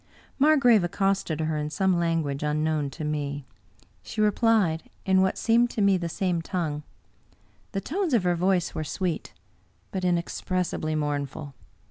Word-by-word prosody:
Margrave 270 Hz, -, +5 dB
accosted 190 Hz, -3 st, 0 dB
her 155 Hz, 0 st, -1 dB
in 150 Hz, 0 st, -2 dB
some 185 Hz, +3 st, +1 dB
language 165 Hz, -5 st, 0 dB
unknown 150 Hz, -1 st, 0 dB
to 155 Hz, +3 st, -8 dB
me. 145 Hz, -2 st, -3 dB, 0.6 s
She 220 Hz, -, -8 dB
replied 210 Hz, -6 st, +2 dB, 0.2 s
in 190 Hz, 0 st, +4 dB
what 190 Hz, 0 st, +1 dB
seemed 235 Hz, +1 st, +3 dB
to 220 Hz, -, -3 dB
me 200 Hz, -1 st, +5 dB
the 170 Hz, -2 st, -2 dB
same 180 Hz, -2 st, -1 dB
tongue. 165 Hz, -4 st, -3 dB, 0.9 s
The 195 Hz, -, -1 dB
tones 335 Hz, -, 0 dB
of 215 Hz, -, +2 dB
her 180 Hz, -1 st, +2 dB
voice 180 Hz, 0 st, +1 dB
were 155 Hz, -, -3 dB
sweet, 175 Hz, +1 st, -3 dB, 0.6 s
but 190 Hz, -1 st, -3 dB
inexpressibly 175 Hz, -2 st, -1 dB
mourn 145 Hz, -2 st, -1 dB
ful. 140 Hz, +1 st, -9 dB
175 Hz, 150 wpm, -26 LUFS, 155-195 Hz, 0.9 s, Margrave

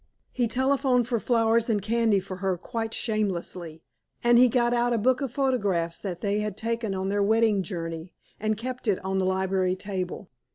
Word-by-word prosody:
He 245 Hz, -2 st, 0 dB
telephoned 260 Hz, 0 st, +2 dB
for 240 Hz, -2 st, 0 dB
flowers 230 Hz, 0 st, +2 dB
and 215 Hz, -2 st, +2 dB
candy 220 Hz, 0 st, +2 dB
for 185 Hz, 0 st, -7 dB
her 190 Hz, -1 st, -1 dB
quite 225 Hz, +4 st, -4 dB
shamelessly, 180 Hz, -8 st, -3 dB, 0.4 s
and 240 Hz, 0 st, +6 dB
he 250 Hz, -, +7 dB
got 240 Hz, 0 st, +2 dB
out 240 Hz, 0 st, +2 dB
a -, -, +2 dB
book 255 Hz, +4 st, +2 dB
of 270 Hz, -4 st, -2 dB
photographs 205 Hz, -11 st, 0 dB
that 180 Hz, -4 st, -5 dB
they 205 Hz, 0 st, 0 dB
had 210 Hz, -1 st, -3 dB
taken 225 Hz, -2 st, -2 dB
on 190 Hz, 0 st, -2 dB
their 205 Hz, +1 st, +1 dB
wedding 220 Hz, 0 st, +3 dB
journey, 165 Hz, -1 st, -6 dB, 0.2 s
and 215 Hz, 0 st, 0 dB
kept 250 Hz, +2 st, -6 dB
it 200 Hz, -3 st, +3 dB
on 190 Hz, 0 st, 0 dB
the 185 Hz, -, +1 dB
library 190 Hz, -1 st, +1 dB
table. 185 Hz, 0 st, -5 dB
210 Hz, 190 wpm, -26 LUFS, 190-235 Hz, 0.4 s, he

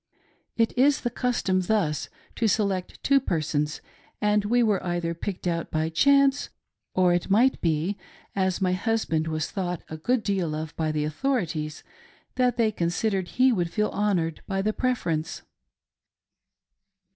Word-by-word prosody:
It 230 Hz, -1 st, +2 dB
is 275 Hz, +3 st, +4 dB
the 240 Hz, -, -2 dB
custom 240 Hz, -7 st, 0 dB
thus 180 Hz, -6 st, 0 dB, 0.3 s
to 230 Hz, -, +1 dB
select 195 Hz, -3 st, -1 dB
two 275 Hz, 0 st, +5 dB
persons, 155 Hz, -, -1 dB, 0.4 s
and 210 Hz, 0 st, +2 dB
we 240 Hz, +3 st, +3 dB
were 210 Hz, -4 st, +1 dB
either 175 Hz, -1 st, -1 dB
picked 180 Hz, +3 st, -5 dB
out 170 Hz, -1 st, -1 dB
by 155 Hz, 0 st, 0 dB
chance, 275 Hz, -, +3 dB, 0.5 s
or 180 Hz, -1 st, +4 dB
!t -, -, -12 dB
might 235 Hz, +7 st, +3 dB
be, 165 Hz, +4 st, 0 dB, 0.4 s
as 190 Hz, -2 st, +1 dB
my 185 Hz, -2 st, +1 dB
husband 185 Hz, -6 st, 0 dB
was 155 Hz, -1 st, -2 dB
thought 180 Hz, -3 st, -3 dB
a 155 Hz, -, -6 dB
good 240 Hz, +8 st, 0 dB
deal 185 Hz, -7 st, -1 dB
of 155 Hz, +1 st, -5 dB
by 155 Hz, -1 st, -1 dB
the 150 Hz, -1 st, -1 dB
kuthorities, 155 Hz, -, -2 dB, 0.5 s
that 250 Hz, -2 st, +1 dB
they 225 Hz, -2 st, +3 dB
considered 190 Hz, +1 st, -1 dB
he 255 Hz, +7 st, +3 dB
would 175 Hz, -7 st, 0 dB
feel 210 Hz, +4 st, 0 dB
honored 180 Hz, -6 st, 0 dB
by 195 Hz, -1 st, -1 dB
the 215 Hz, +1 st, +1 dB
preference. 170 Hz, -12 st, -1 dB
190 Hz, 150 wpm, -26 LUFS, 165-225 Hz, 0.5 s, two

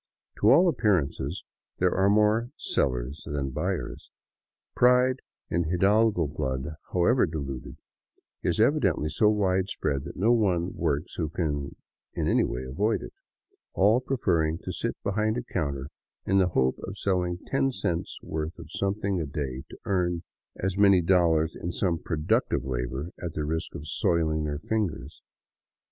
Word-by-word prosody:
To 105 Hz, -, +5 dB
all 170 Hz, +9 st, +7 dB
appearances, 105 Hz, -, 0 dB, 0.3 s
there -, -, +2 dB
are 95 Hz, +1 st, +3 dB
more 105 Hz, +3 st, +3 dB
sellers 65 Hz, +3 st, -1 dB
than 70 Hz, -2 st, -2 dB
buyers. -, -, -3 dB, 0.7 s
Pride 125 Hz, +1 st, +4 dB, 0.3 s
in 85 Hz, 0 st, +1 dB
hidalgo 100 Hz, +1 st, +3 dB
blood, 65 Hz, 0 st, -3 dB, 0.2 s
however 95 Hz, +8 st, +3 dB
diluted, 70 Hz, -5 st, -5 dB, 0.6 s
is 85 Hz, -, 0 dB
evidently 105 Hz, -, +2 dB
so 105 Hz, +7 st, +3 dB
widespread 95 Hz, -8 st, 0 dB
that -, -, -7 dB
no 110 Hz, +6 st, +3 dB
one 95 Hz, -7 st, +2 dB
works 70 Hz, +5 st, -1 dB
who 80 Hz, -3 st, -1 dB
can 75 Hz, -3 st, -2 dB, 0.4 s
in -, -, -1 dB
any -, -, +3 dB
way 60 Hz, +2 st, -3 dB
avoid 100 Hz, -, 0 dB
it, -, -, -9 dB, 0.6 s
all 105 Hz, +5 st, +5 dB
preferring 85 Hz, -12 st, +1 dB
to 90 Hz, -, -4 dB
sit -, -, -3 dB
behind 110 Hz, +3 st, 0 dB
a 125 Hz, -, -3 dB
counter 70 Hz, -, -3 dB, 0.4 s
in 95 Hz, -, +3 dB
the 95 Hz, -, +4 dB
hope 65 Hz, 0 st, +2 dB
of 95 Hz, +1 st, -7 dB
selling 90 Hz, -3 st, 0 dB
ten 135 Hz, 0 st, +1 dB
cents' 95 Hz, -6 st, -2 dB
worth 80 Hz, +1 st, -4 dB
of 80 Hz, -2 st, -11 dB
something 100 Hz, -1 st, -1 dB
a 75 Hz, -, -3 dB
day 70 Hz, -3 st, -4 dB
to -, -, -11 dB
earning 90 Hz, -3 st, 0 dB, 0.3 s
as 95 Hz, +1 st, -2 dB
many 100 Hz, -3 st, +6 dB
dollars 85 Hz, -3 st, +3 dB
in 85 Hz, -, -4 dB
some 85 Hz, -1 st, 0 dB
productive 75 Hz, -5 st, 0 dB
labor 65 Hz, +5 st, -3 dB
at 85 Hz, -2 st, -4 dB
the 75 Hz, -, -2 dB
risk 80 Hz, +2 st, -3 dB
of 75 Hz, -, -7 dB
soiling 80 Hz, -2 st, +1 dB
their 75 Hz, -1 st, -2 dB
fingers. 80 Hz, -7 st, -3 dB
85 Hz, 150 wpm, -27 LUFS, 75-100 Hz, 0.7 s, all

